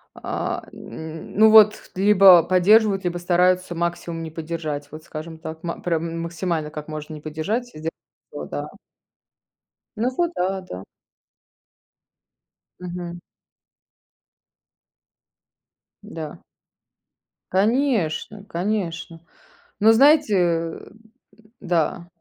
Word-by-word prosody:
А, - - -4
м. 160 0 -9
Ну, 220 0 +7
вот 215 -1 +6
либо 190 -2 +7
поддерживают, 195 +3 +4
либо 175 0 -1
стараются 180 +1 +2
максимум 170 -1 -3
не 160 - -6
поддержать, 155 -3 -5
вот, 155 +1 -10
скажем 160 +1 -8
так. 160 0 -8
Ма 170 -1 -5
прям 170 -1 -1
м 165 0 -5
максимально 170 -2 -3
как 150 -1 -8
можно 155 0 -7
не 150 - -9
поддержать, 160 +11 -3
сделать 160 -6 -6 0.4
всё, - - -7
да. - - -5 1.3
Ну 230 +3 0
вот 345 -1 +1
да, 190 +2 -1
да. 95 - -9 2.0
Мгм. 175 -1 -6 2.8
Да. 165 -8 -8 1.1
Конечно, 210 - 0
конечно! 175 -4 -3 0.6
Ну, 220 +1 +6
знаете, 280 0 +5
э, 165 -2 -1 0.7
да. 170 -2 -1
175 Hz, 100 wpm, -22 LUFS, 160-200 Hz, 2.8 s, Ну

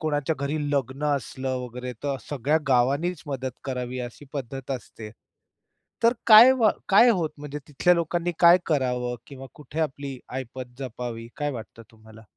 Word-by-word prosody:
कोणाच्या 150 0 0
घरी 140 +2 -2
लग्न 140 0 -1
असलं 130 -1 -4
वगैरे, 125 +1 -6
तर 140 -1 0
सगळ्या 145 +2 +1
गावांनीच 140 +7 +2
मदत 130 -2 -3
करावी 125 -1 -4
अशी 135 +4 -15
पद्धत 135 -1 -6
असते. 115 -4 -6 0.9
तर 230 +1 +5
काय 230 +3 +10
वा 230 -5 +4 0.2
काय 205 +5 +7
होतं 170 -7 0
म्हणजे 150 0 -6
तिथल्या 165 +5 +3
लोकांनी 170 +1 -1
काय 170 +1 +8
करावं? 125 -5 0
किंवा 135 -1 -10
कुठे 150 +2 -6
आपली 140 -3 -3
आयपत 130 -1 -7
जपावी, 120 -3 -6
काय 145 0 -1
वाटतं 115 -1 -9
तुम्हाला? 110 0 -16
135 Hz, 150 wpm, -25 LUFS, 125-155 Hz, 0.9 s, काय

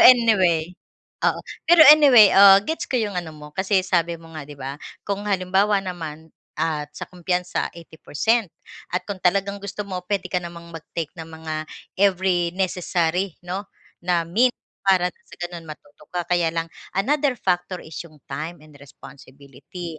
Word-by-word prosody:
anyway, 190 -9 +5 0.5
oo, - - +2 0.3
pero 340 -1 +8
anyway, 265 -9 +7
ah, 195 0 +9
gets 320 - -3
ko 255 - 0
yung 215 -4 -1
ano 175 -2 -4
mo 150 0 -12
kasi 190 +2 +1
sabi 170 -2 0
mo 165 0 -15
nga, 155 -3 -8
'di 145 - -10
ba, 135 +2 -7 0.2
kung 205 +1 -3
halimbawa 195 +2 +2
naman 160 -3 -7 0.2
at 155 -2 -2
sa - - -5
kumpiyansa, 180 0 -2
80% 170 +7 -1 0.4
at 180 - -2
kung 200 -2 -6
talagang 200 +2 +1
gusto 200 +1 -5
mo 185 -2 -5
puwede 200 -2 -1
ka 180 - +1
namang 170 -1 -10
mag-take 165 -1 -6
ng 165 -2 -9
mga 160 -1 -6 0.3
every 185 -3 +2
necessary 180 -1 -1
'no, 190 +3 -5 0.3
na 175 -1 0
mint 235 +9 +2 0.3
para 180 -2 +4
nang - - -35
sa - - -13
gano'n 175 -1 -6
matuto 150 -1 -13
ka 175 - 0
kaya 175 -1 +2
lang 165 0 -2 0.2
another 275 +7 +1
factor 180 -4 -2
is 160 - -9
yung 155 -4 -20
time 150 +4 -6
and 150 -2 -17
responsibility. 140 +4 -11
180 Hz, 160 wpm, -22 LUFS, 160-195 Hz, 0.5 s, ah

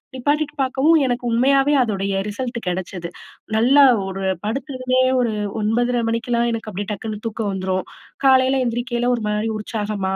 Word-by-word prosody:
நிப்பாட்டிட்டு 295 +3 0
பார்க்கவும் 270 +5 +3
எனக்கு 245 0 -1
உண்மையாவே 275 +4 +3
அதோடைய 195 -3 -2 0.2
ரிசல்ட் 240 +2 -4
கெடைச்சது, 180 -1 -4 0.5
நல்லா 270 +5 +6 0.2
ஒரு 195 0 -5 0.2
படுத்ததுமே 255 +1 -1 0.2
ஒரு 235 -3 +1 0.3
9:30 240 +3 +1
மணிக்கெல்லாம் 235 +1 0
எனக்கு 225 -1 -4
அப்பிடியே 205 +3 -5
டக்குனு 215 +1 -6
தூக்கம் 215 -2 -3
வந்துரும், 185 -1 -2 0.4
காலையில 260 0 +4
எந்திரிக்கயில 240 +1 -1
ஒருமாரி 210 0 -2
உற்சாகமா, 205 -3 -3
235 Hz, 130 wpm, -21 LUFS, 210-255 Hz, 0.5 s, நல்லா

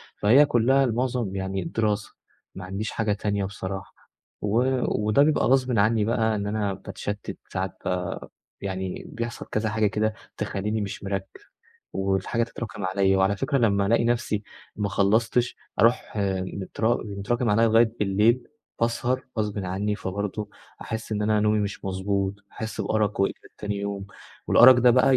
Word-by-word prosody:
فهي 130 +8 +6
كلّها 135 +2 +3
المعظم 120 -4 -1
يعني 95 0 -2
الدراسة، 110 -8 -1 0.4
ما 95 -1 -7
عنديش 100 +4 -4
حاجة 105 -2 0
تانية 100 -1 -1
بصراحة، 95 -1 -6 0.5
و 105 +3 +1 0.5
وده 125 +7 +5
بيبقى 155 0 +3
غصبٍ 130 -4 +3
عني 105 0 +3
بقى 110 -1 +1
إن 100 0 -2
أنا 105 -2 -1
باتشتِّت 100 +1 -6 0.2
ساعات 95 0 -3
ب 90 -1 -1 0.4
يعني 95 -1 -4
بيحصل 115 0 -5
كذا 110 0 -1
حاجة 105 0 +2
كده 110 +1 0 0.2
تخليني 105 +2 -2
مش 100 0 -5
مركِّز، 95 -1 -2 0.7
والحاجة 95 +4 0
تتراكم 110 -4 -5
عليَّ، 95 +1 +2
وعلى 95 +1 +2
فكرة 140 +6 0
لمّا 100 -4 +2
ألاقي 115 +2 +3
نفسي 120 -3 0 0.3
ما 105 -1 -1
خلّصتش 115 +5 +2 0.2
أرُوح 115 -1 +2
آآ، 95 -2 0
مت 95 +2 -6 0.4
متراكم 120 +3 0
عليَّ 115 +3 +4
لغاية 115 0 +4
بالليل 105 +5 +2 0.3
باسهر 120 +2 0
غصبٍ 105 -1 -1
عني، 100 +3 -1
فبرضه 100 +2 -4 0.3
أحس 110 0 -5
إن 105 0 -1
أنا 105 0 +2
نومي 105 0 +3
مش 100 -1 -4
مضبوط، 95 +1 -1 0.2
أحس 110 -1 -5
بأَرَق 105 0 0
وإجهاد 100 - -1
تاني 105 -1 -3
يوم، 100 -1 -4 0.4
والأَرَق 130 +1 +8
ده 125 0 +5
بقى 130 +1 +5
105 Hz, 155 wpm, -25 LUFS, 100-115 Hz, 0.7 s, والأَرَق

